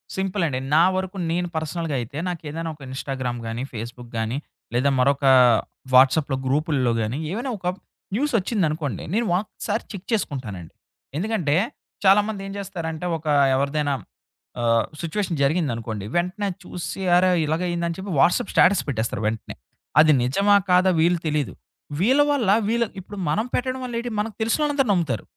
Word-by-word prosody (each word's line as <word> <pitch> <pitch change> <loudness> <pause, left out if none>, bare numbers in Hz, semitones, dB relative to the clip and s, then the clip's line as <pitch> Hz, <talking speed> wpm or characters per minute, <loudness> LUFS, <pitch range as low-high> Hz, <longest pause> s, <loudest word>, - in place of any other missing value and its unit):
సింపులండి. 185 -8 -1 0.2
నా 165 - +7
వరకు 190 +1 -3
నేను 175 +1 0
పర్సనల్‌గా 160 -1 -2
అయితే 120 +5 -7
నాకేదైన 165 -1 -4
ఒక 150 - -21
ఇన్‌స్టాగ్రామ్ 130 -2 -4
గాని, 115 +3 -3
ఫేస్‌బుక్ 120 +2 -7
గాని, 110 +4 -1 0.4
లేదా 130 +4 +2
మరొక 140 +2 +2 0.7
వాట్సాప్‌లో 135 +1 +5
గ్రూపుల్లో 140 -3 +1
గాని, 110 +6 -2
ఏవైనా 245 +6 -3
ఒక 180 - -13 0.5
న్యూసోచ్చిందనుకోండి. 185 - 0
నేను 235 +2 +1
ఒక్కసారి 210 +2 -3
చెక్ 195 -2 -8
చేసుకుంటానండి. 115 - -3 0.4
ఎందుకంటే 180 -6 0 0.5
చాలామంది 205 +1 +4
ఏం 195 - -6
జేస్తారంటే, 175 -4 -5
ఒక 160 - -17 0.3
ఎవరిదైనా 140 +1 0 0.7
ఆహ్, 115 -1 +3 0.2
సిట్యుయేషన్ 170 0 -2
జరిగిందనుకోండి. 120 - -1
వెంటనే 180 +4 0 0.2
చూసి, 180 +2 -6
అరే! 185 +1 +5
ఇలాగయిందా 170 +2 -1
అని 165 - -3
చెప్పి, 190 0 -6
వాట్సాప్ 170 +7 +3
స్టేటస్ 190 0 +5
పెట్టేస్తారు 110 -4 -2
వెంటనే. 110 +1 -3 0.4
అది 155 0 +7
నిజమా, 200 +11 +3
కాదా 180 +1 +5
వీళ్ళు 170 +2 +3
తెలీదు. 150 - -1 0.5
వీళ్ళ 260 +9 +4
వల్ల 240 -9 +1 0.2
వీళ్ళ 235 +1 +2 0.2
ఇప్పుడు 200 +2 -10
మనం 215 +10 +1
పెట్టడం 255 +1 -1
వల్ల 240 -2 -5
ఏటి, 240 0 -4
మనకు 215 0 -2
తెలిసినోళ్ళందరు 275 +2 +1
నమ్ముతారు. 160 - 0
165 Hz, 140 wpm, -23 LUFS, 135-200 Hz, 0.7 s, నా